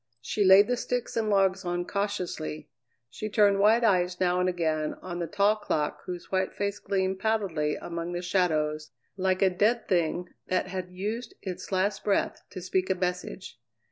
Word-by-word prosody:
She 205 - -1
laid 195 +2 +8
the 245 0 0
sticks 245 0 -3
and 220 -2 0
logs 195 -1 +2
on 175 0 -2
cautiously; 180 -6 -3 0.4
she 215 - -6
turned 205 -1 +4
wide 220 +4 +5
eyes 180 -4 +2
now 180 -1 +2
and 180 0 +2
again 160 -3 -1
on 175 -1 -5
the 170 - -2
tall 205 +3 +2
clock 150 -7 -1
whose 180 -1 -6
white 190 0 0
face 200 0 -2
gleamed 190 -1 -1
pallidly 190 -9 0
among 170 0 -5
the 175 +1 -3
shadows 155 -5 0 0.3
like 190 0 +1
a 190 - +5
dead 215 +6 +1
thing 175 0 0 0.2
that 185 0 0
had 185 -1 -4
used 215 - -4
its 185 0 -6
last 195 +2 0
breath 200 - 0
to 185 - -8
speak 185 +1 0
a 190 - +2
message. 180 - -4
185 Hz, 175 wpm, -28 LUFS, 175-200 Hz, 0.4 s, laid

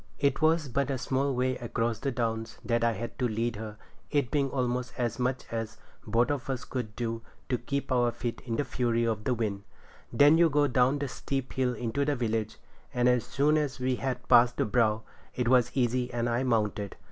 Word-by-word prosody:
It 140 +2 +1
was 160 -1 +3
but 140 +2 -1
a 135 - 0
small 135 +1 0
way 130 +1 0
across 115 -1 -2
the 140 - -1
Downs 115 -2 -2
that 115 -1 +1
I 115 0 +3
had 115 +6 -6
to 125 - +2
lead 115 0 -1
her, 105 -1 -7 0.3
it 140 -4 0
being 140 -2 +1
almost 125 -1 -1
as 120 0 -1
much 125 +1 0
as 115 -1 -4 0.3
both 115 +5 +2
of 140 -2 -3
us 130 -2 -3
could 115 -5 -5
do 115 -1 -3 0.3
to 125 -3 0
keep 140 -1 -3
our 120 -1 +3
feet 120 0 -4
in 115 - -1
the 145 - 0
fury 120 -2 0
of 110 -2 -2
the 125 - +1
wind. 105 -4 -2 0.5
Then 145 +7 +6
you 170 -1 +6
go 145 0 +3
down 130 +1 +3
the 140 0 -2
steep 135 0 -4
hill 125 -2 0
into 120 +4 -1
the 145 0 +1
village, 110 -3 -2 0.3
and 125 0 +2
as 125 -2 +3
soon 150 +2 +2
as 145 -3 -3
we 125 0 0
had 130 -1 -3
passed 120 +1 +6
the - - +2
brow, 110 -1 +2 0.3
it 125 -1 0
was 125 -1 +4
easy 125 -1 +1
and 120 -1 -1
I 120 +1 +1
mounted. 105 -5 0
125 Hz, 215 wpm, -29 LUFS, 115-135 Hz, 0.5 s, Then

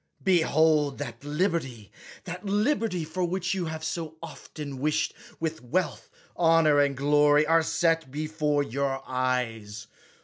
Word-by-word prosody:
Behold 160 -5 +3
that 125 -3 -7
liberty, 145 - -2 0.3
that 180 +3 -7
liberty 210 - 0
for 180 +4 -3
which 185 +1 -1
you 185 -3 -2
have 160 0 -5
so 160 -1 -4
often 150 -4 -8
wished, 155 +2 0 0.3
with 160 -1 -3
wealth, 155 +7 -2 0.3
honor, 165 -3 +4
and 140 -2 +2
glory, 145 +1 +4
are 165 +1 +4
set 165 -2 +1
before 150 0 -1
your 135 +1 -2
eyes. 115 -5 -2
155 Hz, 130 wpm, -27 LUFS, 140-165 Hz, 0.3 s, honor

